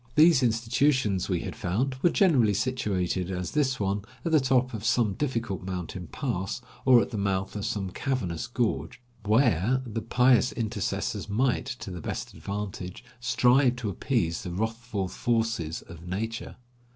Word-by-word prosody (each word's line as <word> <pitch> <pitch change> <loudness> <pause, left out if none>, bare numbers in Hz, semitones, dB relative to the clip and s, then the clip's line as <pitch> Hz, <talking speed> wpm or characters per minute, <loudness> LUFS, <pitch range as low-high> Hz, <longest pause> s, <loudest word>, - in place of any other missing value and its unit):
These 155 -2 +6
institutions, 115 -3 +2
we 90 -3 0
had - - -5
found, 110 +6 -1
were 175 - +5
generally 130 - +4
situated 95 -8 -1
as 90 -1 -3
this 135 -4 +1
one, 100 0 0 0.2
at 165 - 0
the 155 - +6
top 130 -1 +2
of 105 -2 -5
some 110 -2 +2
difficult 115 -6 -2
mountain 90 0 -5
pass 105 -8 -3 0.3
or 125 -3 +7
at - - -8
the 110 - -3
mouth 95 -1 -1
of 105 - -2
some 95 -3 -2
cavernous 115 - -2
gorge, 120 +1 -1 0.3
where 110 - +3
the 115 -1 -4
pious 125 +2 +3
intercessors 105 -2 -2
might, 125 +3 +1
to 125 -7 -6
the 90 -2 -6
best - - -5
advantage, 100 -2 -5 0.2
strive 125 +1 +4
to 120 -5 -3
appease 90 - 0
the 90 - -5
wrathful 110 +1 -2
forces 110 -6 -1
of 85 +1 -12
nature. 110 +5 -4
110 Hz, 155 wpm, -27 LUFS, 95-125 Hz, 0.3 s, or